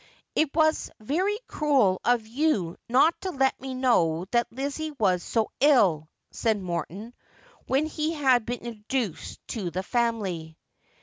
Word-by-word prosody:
' -, -, -49 dB
It 310 Hz, -, +3 dB
was 315 Hz, -1 st, +2 dB
very 360 Hz, -, 0 dB
cruel 265 Hz, -, +2 dB
of 240 Hz, -2 st, +2 dB
you 225 Hz, -, 0 dB
not 275 Hz, +7 st, +4 dB
to 380 Hz, -, -3 dB
let 270 Hz, -7 st, 0 dB
me 265 Hz, -1 st, -5 dB
know 180 Hz, -10 st, +2 dB
that 240 Hz, 0 st, +1 dB
Lizzie 280 Hz, +5 st, -3 dB
•was 190 Hz, -9 st, +1 dB
so 225 Hz, +2 st, -1 dB
ill,' 190 Hz, -, +4 dB, 0.2 s
said 220 Hz, -2 st, 0 dB
Morton, 185 Hz, +5 st, -5 dB, 0.5 s
when 275 Hz, +4 st, +2 dB
he 310 Hz, +1 st, -2 dB
had 260 Hz, -6 st, +3 dB
been 240 Hz, +1 st, -4 dB
introduced 225 Hz, -, -4 dB
to 200 Hz, -7 st, -3 dB
the 185 Hz, +3 st, -3 dB
family. 195 Hz, -9 st, -2 dB
240 Hz, 145 wpm, -26 LUFS, 190-285 Hz, 0.5 s, not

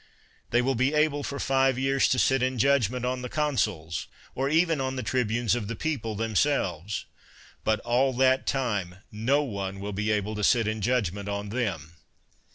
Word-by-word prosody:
They 120 Hz, +1 st, +2 dB
will 135 Hz, +2 st, +1 dB
be 130 Hz, +5 st, +1 dB
able 150 Hz, -1 st, +2 dB
for 140 Hz, 0 st, -4 dB
five 135 Hz, -1 st, +2 dB
years 135 Hz, +1 st, +2 dB
to 130 Hz, -, +1 dB
sit 135 Hz, 0 st, +3 dB
in 130 Hz, 0 st, 0 dB
judgment 125 Hz, -1 st, +2 dB
on 125 Hz, 0 st, -1 dB
the 125 Hz, -, -5 dB
consuls, 105 Hz, -, -1 dB, 0.3 s
or 135 Hz, +2 st, -1 dB
even 165 Hz, -1 st, +2 dB
on 130 Hz, 0 st, -2 dB
the 130 Hz, -, -3 dB
tribunes 115 Hz, -1 st, 0 dB
of 120 Hz, -4 st, -2 dB
the 115 Hz, -, -4 dB
people 115 Hz, -6 st, -3 dB
themselves; 105 Hz, -, 0 dB, 0.6 s
but 110 Hz, -1 st, +1 dB
all 125 Hz, +3 st, +2 dB
that 130 Hz, +1 st, +2 dB
time 105 Hz, -10 st, -1 dB, 0.2 s
no 125 Hz, +8 st, +1 dB
one 100 Hz, -6 st, -4 dB
will 100 Hz, +1 st, -5 dB
be 105 Hz, +2 st, -1 dB
able 105 Hz, 0 st, 0 dB
to 105 Hz, -1 st, -4 dB
sit 115 Hz, +1 st, +3 dB
in 110 Hz, 0 st, -2 dB
judgment 100 Hz, -4 st, -1 dB
on 100 Hz, 0 st, -3 dB
them. 95 Hz, -, -3 dB
120 Hz, 180 wpm, -27 LUFS, 105-135 Hz, 0.6 s, sit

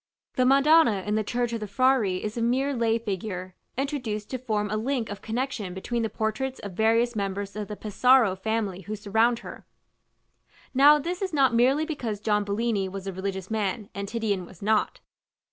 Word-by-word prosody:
The 255 Hz, 0 st, +2 dB
Madonna 275 Hz, -, +5 dB
in 210 Hz, -, -1 dB
the 215 Hz, 0 st, +1 dB
church 240 Hz, +2 st, -1 dB
of 230 Hz, -, -2 dB
the 210 Hz, -, -5 dB
Frari 210 Hz, -4 st, +2 dB
is 210 Hz, 0 st, -4 dB
a 235 Hz, -, -2 dB
mere 260 Hz, +4 st, +1 dB
lay 230 Hz, -2 st, +1 dB
figure, 190 Hz, -4 st, -5 dB, 0.2 s
introduced 250 Hz, -7 st, -3 dB
to 255 Hz, -, -3 dB
form 210 Hz, -4 st, -2 dB
a -, -, 0 dB
link 235 Hz, 0 st, -1 dB
of 205 Hz, -, -7 dB
connexion 225 Hz, -5 st, -3 dB
between 235 Hz, +5 st, -2 dB
the 225 Hz, -, -1 dB
portraits 220 Hz, +5 st, -2 dB
of 200 Hz, -, -6 dB
various 225 Hz, +4 st, +2 dB
members 200 Hz, 0 st, -3 dB
of 210 Hz, -1 st, -4 dB
the 210 Hz, -, -6 dB
Pesaro 225 Hz, 0 st, +3 dB
family 205 Hz, -2 st, -2 dB
who 210 Hz, +4 st, -5 dB
surround 220 Hz, +3 st, +2 dB
her. -, -, -9 dB, 1.1 s
Now 285 Hz, +3 st, +7 dB
this 345 Hz, +5 st, -4 dB
is 375 Hz, -3 st, -2 dB
not 270 Hz, -4 st, +3 dB
merely 265 Hz, +6 st, +3 dB
because 235 Hz, -10 st, -4 dB
John 210 Hz, -1 st, +1 dB
Bellini 205 Hz, -1 st, -1 dB
was 195 Hz, 0 st, -7 dB
a 195 Hz, -, -4 dB
religious 190 Hz, +1 st, -4 dB
man 210 Hz, -1 st, -2 dB
and 200 Hz, 0 st, -5 dB
Titian 210 Hz, -4 st, -1 dB
was 190 Hz, 0 st, -14 dB
not. 215 Hz, +1 st, +1 dB
220 Hz, 190 wpm, -26 LUFS, 200-250 Hz, 1.1 s, Now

